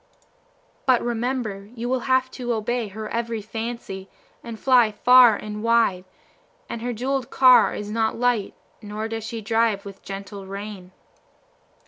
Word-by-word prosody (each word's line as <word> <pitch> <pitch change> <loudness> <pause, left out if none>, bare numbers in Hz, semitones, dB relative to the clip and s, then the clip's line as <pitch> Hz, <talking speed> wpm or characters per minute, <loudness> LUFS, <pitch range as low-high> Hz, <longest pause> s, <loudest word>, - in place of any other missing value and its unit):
"But 255 -2 +5
remember 235 -4 -3
you 235 0 -4
will 260 +1 +1
have 260 0 +2
to 245 -2 -3
obey 230 +1 -2
her 215 +2 -7
every 230 -1 -2
fancy, 220 -3 -6 0.3
and 230 -2 -8
fly 245 -4 +4
far 245 +1 +6
and 210 +1 -6
wide; 230 -5 +2 0.6
and 235 - -6
her 245 +1 -2
jewelled 255 +2 -2
car 255 -1 +6
is 210 0 -5
not 220 0 0
light, 240 -4 0 0.3
nor 215 +1 -5
does 225 -1 -5
she 230 0 -5
drive 225 -2 +1
with 200 -1 -10
gentle 195 0 -8
rein." 195 -2 -8
225 Hz, 145 wpm, -23 LUFS, 210-240 Hz, 0.6 s, far